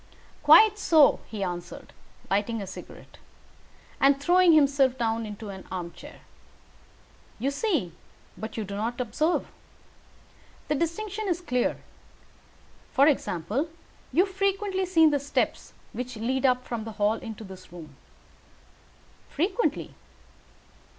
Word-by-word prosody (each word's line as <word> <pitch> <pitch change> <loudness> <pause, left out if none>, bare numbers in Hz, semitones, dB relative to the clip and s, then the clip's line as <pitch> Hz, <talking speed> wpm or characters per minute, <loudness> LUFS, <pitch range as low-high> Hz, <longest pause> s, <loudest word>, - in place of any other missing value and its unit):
"Quite 415 +8 +7
so," 315 -7 +5
he 210 -3 -4
answered, 175 -1 -6 0.3
lighting 205 +4 0
a 200 - -5
cigarette, 190 - -11 0.8
and 275 0 +4
throwing 350 +3 +5
himself 275 -3 +4
down 225 -1 -1
into 210 0 -8
an 190 -1 -8
armchair. 175 -2 -8 1.2
"You 265 +5 -1
see, 280 - -1 0.4
but 220 +1 -7
you 220 - -1
do 200 0 -6
not 230 +4 -3
observe. 295 +8 0 1.2
The - - +3
distinction 400 +7 -2
is 350 -2 0
clear. 250 -9 -1 1.1
For 275 - +5
example, 260 - 0 0.4
you 360 - +4
have 385 - -12
frequently 390 -1 0
seen 325 -4 +5
the 285 - +1
steps 280 +1 -2 0.2
which 250 0 -5
lead 260 +4 +1
up 250 0 +1
from 235 -2 -4
the 220 0 -7
hall 210 +2 +1
to 225 -1 -8
this 190 -3 -12
room." 160 -5 -11 1.3
"Frequently." 375 - -1
260 Hz, 125 wpm, -26 LUFS, 215-330 Hz, 1.3 s, Quite